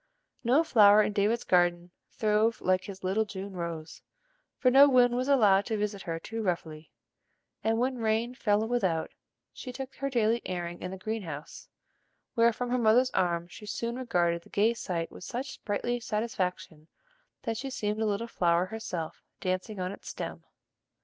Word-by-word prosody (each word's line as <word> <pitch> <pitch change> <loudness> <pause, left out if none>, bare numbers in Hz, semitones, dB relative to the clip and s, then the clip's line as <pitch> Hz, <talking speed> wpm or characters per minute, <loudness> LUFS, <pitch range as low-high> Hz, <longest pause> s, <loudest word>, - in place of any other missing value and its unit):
No 260 +7 +4
flower 215 -7 +6
in 210 - -1
David's 210 +3 +1
garden 175 -1 +2 0.2
throve 215 +1 +1
like 185 0 +1
his 190 -2 -9
little 195 +4 +1
June 200 -1 -7
rose, 170 -3 -6 0.6
for 255 - +3
no 280 +2 +8
wind 245 -2 +5
was 255 +2 -1
allowed 210 -8 +4
to 220 -2 -1
visit 205 -1 -2
her 165 -2 -3
too 225 +6 -5
roughly; 165 -5 -3 0.7
and 225 +1 +2
when 255 +1 0
rain 225 +2 0
fell 215 -3 +1
without, 190 -10 0 0.4
she 255 - -7
took 265 +1 -7
her 275 - -2
daily 235 -2 +2
airing 175 -1 -4
in 180 - -4
the 190 - -6
green 220 +3 -3
house, 155 -4 -8 0.6
where 230 -1 +4
from 245 +2 -4
her 250 - +2
mother's 240 +3 +4
arms 175 -1 0
she 210 - -11
soon 235 +3 -3
regarded 175 -9 0
the - - -19
gay 215 +3 +2
sight 170 -7 -3
with - - -11
such 260 +7 -4
sprightly 240 +4 -2
satisfaction 185 -8 -3 0.6
that 230 -3 -2
she 270 +3 -4
seemed 215 -4 -2
a - - +2
little 210 +2 -1
flower 175 -5 +2
herself 185 -6 -5 0.2
dancing 185 +3 -2
on 180 0 -2
its 200 - -9
stem. - - -6
210 Hz, 175 wpm, -29 LUFS, 180-235 Hz, 0.7 s, no